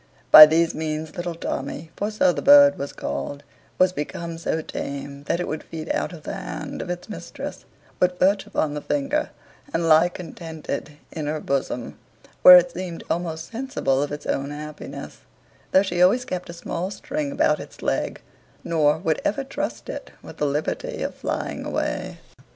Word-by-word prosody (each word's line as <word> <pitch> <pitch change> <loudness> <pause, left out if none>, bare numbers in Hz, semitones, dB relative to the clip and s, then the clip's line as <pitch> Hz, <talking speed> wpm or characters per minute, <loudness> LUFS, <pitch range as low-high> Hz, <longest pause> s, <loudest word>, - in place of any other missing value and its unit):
By 155 0 +13
these 165 +1 +2
means 155 0 -4
little 175 -1 -4
Tommy, 155 0 -5
for 205 - -2
so 265 +6 +3
the - - -3
bird 285 0 +7
was 140 - -4
called, 145 0 -5 0.3
was 185 0 +4
become 165 +2 -5
so 160 - -1
tame, 140 0 -6
that 170 - 0
it 180 - -2
would 155 - -3
feed 160 -1 -6
out - - -1
of 165 -4 -11
the - - -5
hand - - -6
of 180 - -6
its 175 0 -4
mistress, 215 - -7 0.3
would 180 0 +2
perch 195 +2 +2
upon 150 -2 -1
the 150 - -4
finger, 290 - -1 0.4
and 170 -9 0
lie 160 +2 +6
contented 160 -4 -7
in 155 -2 -4
her 155 +1 -1
bosom, 135 -4 -3 0.4
where 180 0 +12
it 175 0 +3
seemed 175 -1 -6
almost 165 0 -3
sensible 230 - -1
of 145 - -2
its 145 0 -6
own 140 +1 -1
happiness; 150 +1 -8 0.5
though 190 - +5
she 180 -3 -1
always 210 +8 +4
kept 180 -1 -5
a - - -6
small 170 +1 -4
string 290 +7 -4
about 280 - +2
its - - -11
leg, - - -1 0.4
nor 155 -2 +2
would 160 -2 -1
ever 275 +7 0
trust 270 - -4
it - - -6
with - - -11
the 150 - +1
liberty 155 - -2
of - - -3
flying - - -4
away. - - -3
170 Hz, 180 wpm, -23 LUFS, 150-185 Hz, 0.5 s, By